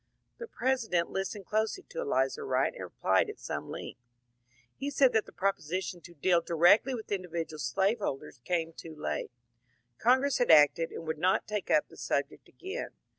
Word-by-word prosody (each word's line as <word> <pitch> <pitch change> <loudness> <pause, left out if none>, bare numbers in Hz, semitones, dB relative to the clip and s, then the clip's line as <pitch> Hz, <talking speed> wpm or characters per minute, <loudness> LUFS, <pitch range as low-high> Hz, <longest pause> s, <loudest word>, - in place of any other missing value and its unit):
The 470 - -6
President 230 - 0
listened 195 +1 -4
closely 220 - -1
to - - -6
Elizur 460 0 0
Wright 425 - +1
and - - -7
replied 465 - +1
at. 425 - -7
some - - -5
length. - - -7 0.8
He 275 +2 -3
said 275 -2 +4
that 220 - +2
the - - -12
proposition 185 -1 -2
to 170 +2 -14
deal 170 +3 +3
directly 175 - +4
with 220 -3 -8
individual 170 -5 -3
slaveholders 150 - -1
came 165 0 -1
too 160 -1 -10
late; 150 - -3 0.7
Congress 260 +4 +3
had 245 - +2
acted 160 +1 +6
and 165 - -7
would 160 -1 -3
not 185 +3 +2
take 210 -2 -3
up - - +3
the - - -16
subject - - -2
again. 390 +7 -6
190 Hz, 170 wpm, -30 LUFS, 165-250 Hz, 0.8 s, acted